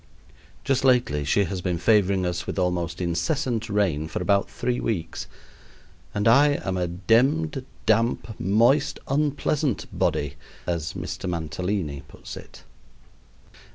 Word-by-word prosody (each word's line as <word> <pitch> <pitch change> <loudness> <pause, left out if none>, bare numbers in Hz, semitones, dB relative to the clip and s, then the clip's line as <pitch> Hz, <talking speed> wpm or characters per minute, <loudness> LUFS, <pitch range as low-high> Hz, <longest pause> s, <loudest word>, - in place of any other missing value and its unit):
Just 135 -1 +1
lately 125 - +3
she 85 +8 +2
has 95 0 -3
been 90 -1 -1
favoring 100 -1 +3
us 90 0 -2
with - - -4
almost 90 -2 -1
incessant 110 - -1
rain 95 -8 +1
for 80 - -4
about 100 -1 +2
three 125 0 -2
weeks; 85 -7 -3 0.8
and 105 -1 0
I 145 +5 +5
am 95 - -1
a 90 -1 0
demned 130 - +2 0.2
damp, 110 -1 +1
moist, 115 - +3
unpleasant 145 -2 0
body, 70 -1 0 0.3
as 85 -4 -2
Mr. - - -4
Mantalini 85 -2 -2
puts - - -10
it. - - -12
100 Hz, 125 wpm, -25 LUFS, 85-125 Hz, 0.8 s, I